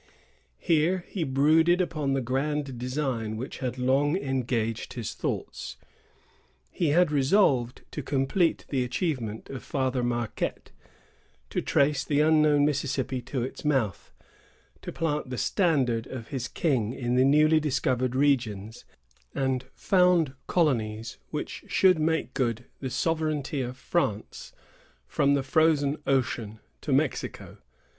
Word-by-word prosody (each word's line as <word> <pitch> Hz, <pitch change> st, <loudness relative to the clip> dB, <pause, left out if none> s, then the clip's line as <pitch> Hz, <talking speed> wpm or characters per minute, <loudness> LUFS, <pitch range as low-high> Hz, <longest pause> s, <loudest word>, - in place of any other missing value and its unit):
Here 170 Hz, -, +1 dB
he 185 Hz, -, -3 dB
brooded 155 Hz, +6 st, +3 dB
upon 155 Hz, -6 st, -1 dB
the 135 Hz, -1 st, 0 dB
grand 135 Hz, +1 st, -2 dB
design 125 Hz, -4 st, -2 dB
which 125 Hz, +5 st, -6 dB
had 130 Hz, -2 st, -3 dB
long 135 Hz, +6 st, +2 dB
engaged 120 Hz, -, -2 dB
his 115 Hz, -4 st, -4 dB
thoughts. -, -, -4 dB, 0.9 s
He 170 Hz, -, 0 dB
had 160 Hz, +2 st, +3 dB
resolved 135 Hz, -, +2 dB
to 150 Hz, -, -4 dB
complete 145 Hz, +6 st, 0 dB
the 130 Hz, -3 st, 0 dB
achievement 125 Hz, -, -3 dB
of 135 Hz, -, -6 dB
Father 130 Hz, -2 st, -1 dB
Marquette, 120 Hz, -2 st, -3 dB, 0.8 s
to -, -, -1 dB
trace 140 Hz, -1 st, +2 dB
the 145 Hz, -1 st, 0 dB
unknown 150 Hz, -1 st, +4 dB
Mississippi 135 Hz, -3 st, -1 dB
to 125 Hz, +1 st, -3 dB
its 130 Hz, -, -6 dB
mouth, 135 Hz, -9 st, 0 dB, 0.7 s
to -, -, -6 dB
plant 150 Hz, -4 st, -2 dB
the 125 Hz, -, -4 dB
standard 130 Hz, -, +1 dB
of 125 Hz, -4 st, -8 dB
his 130 Hz, -4 st, -3 dB
king 125 Hz, -8 st, 0 dB
in 120 Hz, -2 st, -2 dB
the 125 Hz, +1 st, +4 dB
newly 155 Hz, +3 st, +5 dB
discovered 130 Hz, -4 st, 0 dB
regions, 115 Hz, -6 st, 0 dB, 0.5 s
and 130 Hz, -1 st, 0 dB
found 180 Hz, -7 st, +3 dB
colonies 115 Hz, -9 st, 0 dB
which -, -, -5 dB
should 185 Hz, -3 st, +4 dB
make 160 Hz, +1 st, 0 dB
good 120 Hz, -3 st, -1 dB
the 130 Hz, -, -4 dB
sovereignty 150 Hz, 0 st, -1 dB
of 125 Hz, 0 st, -5 dB
France 110 Hz, -9 st, -2 dB, 0.5 s
from 140 Hz, -, +2 dB
the 140 Hz, -, 0 dB
Frozen 145 Hz, 0 st, +2 dB
Ocean 120 Hz, -5 st, 0 dB, 0.2 s
to -, -, -4 dB
Mexico. -, -, -1 dB
135 Hz, 130 wpm, -27 LUFS, 125-150 Hz, 0.9 s, newly